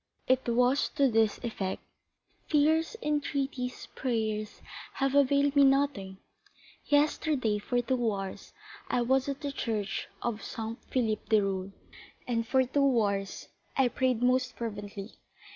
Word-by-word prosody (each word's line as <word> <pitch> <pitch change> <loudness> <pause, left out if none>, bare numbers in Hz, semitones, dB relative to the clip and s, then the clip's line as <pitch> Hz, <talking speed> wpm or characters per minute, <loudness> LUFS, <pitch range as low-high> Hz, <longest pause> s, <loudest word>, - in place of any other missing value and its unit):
It 260 -1 +2
was 250 +4 +3
to 275 -3 +3
this 220 -1 +3
effect: 200 -5 -3 0.7
"Tears, 315 +6 +2
entreaties, 280 -4 -2
prayers, 220 -4 -2 0.3
have 270 -1 0
availed 280 0 +3
me 285 - +7
nothing. 270 -9 +2 0.7
Yesterday, 290 -6 +2
for 245 +4 -1
two 240 -2 +1
hours, 195 -1 -6 0.4
I 245 - +1
was 265 +3 +2
at 275 0 -4
the 285 -2 -3
church 215 -7 -3 0.2
of 230 -3 -2
Saint 225 0 -6
Philippe 220 -4 -1
du 215 -2 +4
Roule, 195 0 -2 0.6
and 230 -2 -1
for 260 +2 +3
two 265 -1 +2
hours 200 -2 -2 0.3
I 265 -2 +4
prayed 250 -1 0
most 255 +1 +2
fervently. 205 -2 -6
245 Hz, 130 wpm, -29 LUFS, 215-275 Hz, 0.7 s, me